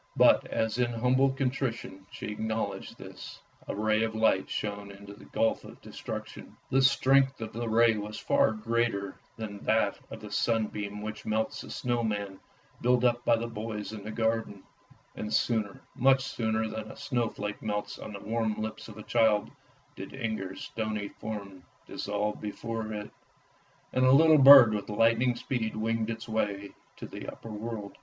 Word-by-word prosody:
But -, -, +5 dB
as 110 Hz, +1 st, -1 dB
in 120 Hz, -1 st, +1 dB
humble 125 Hz, +4 st, +3 dB
contrition 125 Hz, -7 st, -3 dB
she -, -, -6 dB
acknowledged 110 Hz, +1 st, -3 dB
this, -, -, -10 dB, 0.3 s
a -, -, -3 dB
ray 110 Hz, +1 st, +2 dB
of 110 Hz, -1 st, -1 dB
light 110 Hz, -4 st, +2 dB
shone 100 Hz, -1 st, -4 dB
into 100 Hz, 0 st, -11 dB
the 100 Hz, -, -15 dB
gulf 115 Hz, -, 0 dB
of -, -, -12 dB
destruction. -, -, -8 dB
The 135 Hz, -, +4 dB
strength 135 Hz, 0 st, +4 dB
of 110 Hz, -1 st, -6 dB
the 115 Hz, +1 st, -3 dB
ray 115 Hz, 0 st, +5 dB
was 105 Hz, +1 st, -5 dB
far -, -, +3 dB
greater 110 Hz, -3 st, -1 dB, 0.2 s
than 105 Hz, -3 st, -6 dB
that 110 Hz, 0 st, +2 dB
of -, -, -9 dB
the -, -, -9 dB
sunbeam 105 Hz, -2 st, -1 dB
which 110 Hz, 0 st, -6 dB
melts 110 Hz, +1 st, -1 dB
the -, -, -10 dB
snow 120 Hz, -1 st, -1 dB
man 100 Hz, -3 st, -3 dB, 0.4 s
built 125 Hz, 0 st, +3 dB
up 120 Hz, -1 st, +2 dB
by 120 Hz, -, +4 dB
the 115 Hz, +1 st, -3 dB
boys 110 Hz, -2 st, -5 dB
in 105 Hz, -2 st, -7 dB
the 110 Hz, -, -6 dB
garden; 110 Hz, -3 st, -1 dB, 0.5 s
and 105 Hz, -, -5 dB
sooner, 110 Hz, -2 st, 0 dB
much 135 Hz, 0 st, +4 dB
sooner, 110 Hz, -3 st, -1 dB
than 110 Hz, 0 st, -6 dB
a -, -, -13 dB
snowflake 115 Hz, -5 st, -2 dB
melts 105 Hz, -1 st, -3 dB
on -, -, -7 dB
the 100 Hz, -, -8 dB
warm 110 Hz, -1 st, -1 dB
lips 110 Hz, 0 st, -5 dB
of -, -, -11 dB
a 110 Hz, -, -8 dB
child, 110 Hz, -3 st, +2 dB, 0.4 s
did 95 Hz, -, -8 dB
Inger's 110 Hz, -7 st, -4 dB
stony 110 Hz, -2 st, -3 dB
form 100 Hz, -4 st, -7 dB, 0.2 s
dissolve 105 Hz, +1 st, -3 dB
before 110 Hz, +1 st, -4 dB
it, 105 Hz, -1 st, -6 dB, 0.8 s
and 130 Hz, -, +2 dB
a 130 Hz, -, +6 dB
little 155 Hz, +2 st, +7 dB
bird 135 Hz, -5 st, +10 dB
with 105 Hz, 0 st, -3 dB
lightning 115 Hz, +3 st, +3 dB
speed 120 Hz, -2 st, -3 dB
winged 110 Hz, 0 st, -1 dB
its 115 Hz, +1 st, -5 dB
way 100 Hz, -2 st, -2 dB, 0.3 s
to -, -, -7 dB
the -, -, -8 dB
upper 115 Hz, -, -10 dB
world. 105 Hz, -1 st, -6 dB
110 Hz, 170 wpm, -29 LUFS, 105-115 Hz, 0.8 s, bird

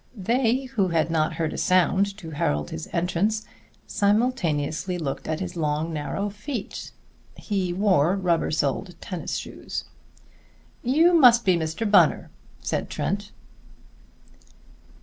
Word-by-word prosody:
They, 235 Hz, +5 st, +1 dB
who 230 Hz, -7 st, 0 dB
had 165 Hz, -1 st, +1 dB
not 160 Hz, 0 st, +1 dB
heard 160 Hz, -1 st, -2 dB
a -, -, -4 dB
sound 190 Hz, +2 st, +2 dB
to 165 Hz, -6 st, -9 dB
herald 75 Hz, -, -1 dB
this 80 Hz, -, -6 dB
entrance, 190 Hz, +5 st, 0 dB, 0.4 s
simultaneously 185 Hz, -, 0 dB
looked 145 Hz, -5 st, -4 dB
at 155 Hz, 0 st, -2 dB
his 180 Hz, -1 st, -5 dB
long, 155 Hz, 0 st, -1 dB
narrow 195 Hz, +7 st, -3 dB
feet. 210 Hz, +2 st, -6 dB, 0.5 s
He 195 Hz, -4 st, -2 dB
wore 185 Hz, -3 st, +3 dB
rubber 180 Hz, -4 st, +1 dB
soled 160 Hz, +4 st, -1 dB
tennis 180 Hz, -6 st, -5 dB
shoes. -, -, -5 dB, 1.0 s
"You 320 Hz, +8 st, +4 dB
must 245 Hz, -7 st, +6 dB
be 185 Hz, -2 st, +4 dB
Mr. 160 Hz, +6 st, -2 dB
Bunner," 205 Hz, -, +4 dB, 0.3 s
said -, -, -2 dB
Trent. 205 Hz, +1 st, -3 dB
185 Hz, 125 wpm, -25 LUFS, 160-210 Hz, 1.0 s, must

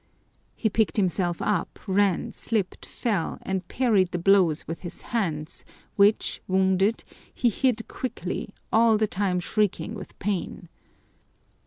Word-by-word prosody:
He 225 Hz, -, 0 dB
picked 220 Hz, +1 st, +1 dB
himself 180 Hz, -3 st, 0 dB
up, 190 Hz, -5 st, -1 dB
ran, 200 Hz, +2 st, +1 dB
slipped, 215 Hz, -4 st, -2 dB
fell, 210 Hz, -9 st, -2 dB
and 190 Hz, -2 st, -3 dB
parried 215 Hz, -7 st, +2 dB
the 180 Hz, -, -2 dB
blows 175 Hz, -3 st, +3 dB
with 165 Hz, 0 st, -4 dB
his 175 Hz, -, -8 dB
hands, 165 Hz, -9 st, -2 dB, 0.3 s
which, 205 Hz, +2 st, +3 dB
wounded, 190 Hz, +3 st, +2 dB, 0.3 s
he 245 Hz, -, +2 dB
hid 230 Hz, 0 st, 0 dB
quickly, 215 Hz, -5 st, -4 dB, 0.2 s
all 225 Hz, -1 st, +5 dB
the 215 Hz, -, +2 dB
time 190 Hz, -2 st, 0 dB
shrieking 210 Hz, +2 st, 0 dB
with 220 Hz, -, -9 dB
pain. 190 Hz, -3 st, -3 dB
195 Hz, 130 wpm, -26 LUFS, 180-220 Hz, 0.3 s, all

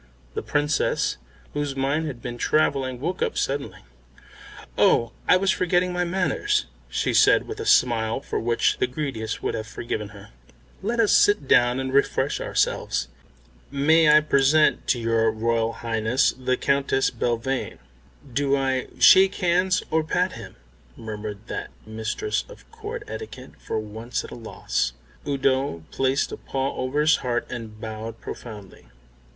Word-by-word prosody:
The -, -, -3 dB
Princess, 145 Hz, +1 st, 0 dB, 0.4 s
whose 145 Hz, -2 st, -2 dB
mind 140 Hz, +4 st, 0 dB
had 125 Hz, -5 st, -7 dB
been 120 Hz, -1 st, -6 dB
travelling, 135 Hz, -4 st, +1 dB
woke 175 Hz, +7 st, -3 dB
up -, -, -1 dB
suddenly. 135 Hz, -9 st, -2 dB, 0.9 s
"Oh, 115 Hz, -1 st, +3 dB, 0.2 s
I -, -, +6 dB
was 190 Hz, +1 st, +2 dB
forgetting 180 Hz, 0 st, +1 dB
my 180 Hz, 0 st, 0 dB
manners," 190 Hz, -, 0 dB, 0.2 s
she -, -, -1 dB
said -, -, +5 dB
with 430 Hz, 0 st, -6 dB
a 440 Hz, -, -4 dB
smile 115 Hz, -2 st, +3 dB
for -, -, -3 dB
which 120 Hz, 0 st, +1 dB
the -, -, +2 dB
greediest 125 Hz, -5 st, -4 dB
would -, -, -1 dB
have 110 Hz, -, -4 dB
forgiven 110 Hz, -3 st, -4 dB
her. -, -, -13 dB, 0.5 s
"Let 230 Hz, +4 st, -2 dB
us 220 Hz, -3 st, +4 dB
sit 205 Hz, -9 st, +4 dB
down 120 Hz, +1 st, +4 dB
and 130 Hz, 0 st, -3 dB
refresh 140 Hz, -, +1 dB
ourselves. -, -, -1 dB, 0.6 s
May 155 Hz, +3 st, +4 dB
I 150 Hz, +1 st, +7 dB
present 150 Hz, +1 st, +3 dB
to 125 Hz, -, +2 dB
your 115 Hz, -1 st, +2 dB
Royal 115 Hz, +1 st, 0 dB
Highness 115 Hz, +2 st, +1 dB
the 130 Hz, 0 st, -1 dB
Countess 140 Hz, -1 st, +1 dB
Belvane." 120 Hz, +2 st, -2 dB, 0.6 s
"Do 140 Hz, +1 st, +2 dB
I 130 Hz, -1 st, -1 dB
shake 190 Hz, +1 st, +7 dB
hands 185 Hz, +1 st, +1 dB
or 160 Hz, 0 st, +2 dB
pat 180 Hz, +3 st, 0 dB
him?" -, -, -10 dB, 0.4 s
murmured 105 Hz, -1 st, -7 dB
that -, -, -5 dB, 0.2 s
mistress 110 Hz, -, -2 dB
of -, -, -14 dB
Court 450 Hz, +1 st, -7 dB
etiquette, 440 Hz, -, -8 dB
for -, -, -4 dB
once 110 Hz, +3 st, -4 dB
at -, -, -11 dB
a -, -, -7 dB
loss. 110 Hz, -, -2 dB, 0.3 s
Udo 135 Hz, -, 0 dB
placed 135 Hz, +1 st, 0 dB
a -, -, -5 dB
paw 135 Hz, 0 st, -3 dB
over 130 Hz, +4 st, -1 dB
his 155 Hz, 0 st, +4 dB
heart 120 Hz, -2 st, -2 dB
and 110 Hz, -3 st, -7 dB
bowed 110 Hz, +1 st, -6 dB
profoundly. 105 Hz, -5 st, -10 dB
135 Hz, 150 wpm, -24 LUFS, 115-155 Hz, 0.9 s, I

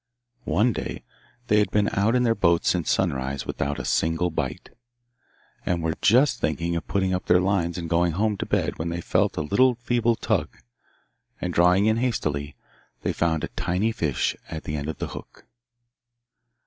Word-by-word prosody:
One 105 Hz, +10 st, +3 dB
day -, -, -5 dB, 0.4 s
they 105 Hz, -2 st, +3 dB
had 105 Hz, -, +2 dB
been 105 Hz, -1 st, +2 dB
out 105 Hz, +4 st, +2 dB
in 125 Hz, -, +3 dB
their 115 Hz, -2 st, +3 dB
boat 85 Hz, -6 st, +2 dB
since 90 Hz, -3 st, +1 dB
sunrise 70 Hz, -6 st, -1 dB
without 70 Hz, +1 st, -2 dB
a -, -, -5 dB
single 80 Hz, +2 st, +1 dB
bite, -, -, -4 dB, 0.9 s
and 85 Hz, -2 st, -1 dB
were 80 Hz, 0 st, 0 dB
just 130 Hz, +7 st, +4 dB
thinking 85 Hz, +2 st, -1 dB
of 85 Hz, -, -4 dB
putting 95 Hz, -2 st, 0 dB
up 90 Hz, -, -3 dB
their 90 Hz, -, +5 dB
lines 90 Hz, -3 st, 0 dB
and 85 Hz, -2 st, -4 dB
going 85 Hz, 0 st, +2 dB
home 105 Hz, +4 st, +1 dB
to -, -, -4 dB
bed -, -, -1 dB
when 80 Hz, +1 st, -2 dB
they 85 Hz, 0 st, -3 dB
felt -, -, 0 dB
a 80 Hz, -, 0 dB
little 125 Hz, -, +3 dB
feeble 120 Hz, 0 st, +1 dB
tug, 100 Hz, -10 st, -1 dB, 0.8 s
and, 90 Hz, 0 st, -3 dB
drawing 90 Hz, +4 st, +4 dB
in 110 Hz, +1 st, +3 dB
hastily, 75 Hz, -, -2 dB, 0.5 s
they -, -, 0 dB
found 80 Hz, -2 st, 0 dB
a -, -, -3 dB
tiny 90 Hz, +5 st, -1 dB
fish 75 Hz, -, -1 dB
at 80 Hz, -, -6 dB
the 75 Hz, -, -4 dB
end 75 Hz, +1 st, -3 dB
of 80 Hz, -, -5 dB
the -, -, -4 dB
hook. -, -, -11 dB
90 Hz, 185 wpm, -25 LUFS, 80-105 Hz, 0.9 s, their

